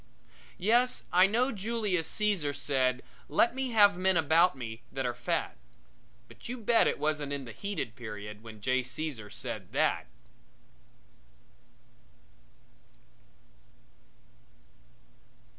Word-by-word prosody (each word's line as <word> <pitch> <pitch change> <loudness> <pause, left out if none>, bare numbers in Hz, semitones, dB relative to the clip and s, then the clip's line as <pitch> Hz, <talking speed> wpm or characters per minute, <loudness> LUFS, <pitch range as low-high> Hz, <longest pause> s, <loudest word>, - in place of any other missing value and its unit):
Yes, 240 +6 +2
I 185 +2 +7
know 245 +6 +1
Julius 205 -5 -1
Caesar 195 -10 0
said: 130 -3 0 0.3
"Let 235 - +3
me 265 0 -2
have 205 -5 +5
men 190 -1 +3
about 165 +1 +4
me 115 -2 -7
that 135 -1 -3
are 120 - 0
fat." 120 0 -2 0.7
But - - -12
you 250 - -4
bet 230 0 +3
it - - 0
wasn't 150 -2 -1
in 140 -2 -3
the 115 - -8
heated 200 - -4
period 105 -3 -8
when 110 -2 -11
J. 130 +3 +1
Caesar 130 -4 -4
said 115 -5 -6
that! - - +1
155 Hz, 110 wpm, -30 LUFS, 125-205 Hz, 0.7 s, I